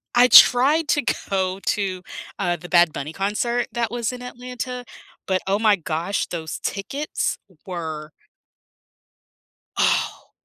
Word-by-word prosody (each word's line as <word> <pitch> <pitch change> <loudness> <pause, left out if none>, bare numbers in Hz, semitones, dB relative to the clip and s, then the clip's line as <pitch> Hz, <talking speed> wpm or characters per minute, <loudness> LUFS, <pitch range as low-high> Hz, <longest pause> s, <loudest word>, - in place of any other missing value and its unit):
I 245 +1 +7
tried 280 +6 +7
to 290 - +2 0.3
go 190 -1 -1
to, 195 -2 -2 0.4
uh, 175 -1 0
the 175 +1 -11
Bad 175 -2 +5
Bunny 145 +3 -5
concert 225 +6 -1
that 235 -2 -2
was 240 -1 -2
in 250 0 -8
Atlanta, 250 0 -6 0.4
but 190 -2 +1
oh 200 +2 +1
my 215 -2 +4
gosh, 170 +2 -2
those 160 -2 -5
tickets 275 +10 -3 0.3
were 160 -4 -6 1.7
Oh, - - 0
200 Hz, 125 wpm, -22 LUFS, 175-245 Hz, 1.7 s, I